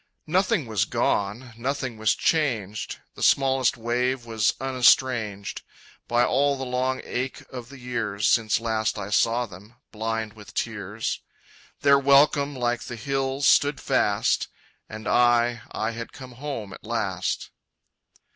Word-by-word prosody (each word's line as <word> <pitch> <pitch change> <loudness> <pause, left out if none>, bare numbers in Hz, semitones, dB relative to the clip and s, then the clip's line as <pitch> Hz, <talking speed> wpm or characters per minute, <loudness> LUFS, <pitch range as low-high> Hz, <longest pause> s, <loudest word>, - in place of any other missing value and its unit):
Nothing 185 - +1
was 110 -3 0
gone, 115 +5 -1
nothing 130 -1 -2
was 110 -1 +3
changed, 115 - 0 0.2
The - - -11
smallest 135 -3 +3
wave 120 +2 -1
was 110 -2 +1
unestranged 125 -5 +2 0.5
By 120 +1 +3
all 140 +1 +2
the 135 - -4
long 130 +1 -1
ache 130 +2 -4
of 125 -2 -8
the 140 - -11
years 115 -5 -2
Since 110 -2 +3
last 110 -1 -1
I 105 0 -5
saw 115 +3 +2
them, 105 +3 -14 0.2
blind 110 0 -3
with 105 -2 -14
tears. 105 -1 -3 0.6
Their 140 -1 +6
welcome 140 +1 +4
like 120 -1 -1
the 120 - -6
hills 135 +3 -1
stood 145 0 +4
fast: - - +1 0.4
And 110 +1 -7
I, 120 -1 +3
I - - -2
had 115 0 -7
come 130 -3 -10
home 120 -6 -6
at - - -12
last. - - -2
120 Hz, 135 wpm, -25 LUFS, 110-135 Hz, 0.6 s, Their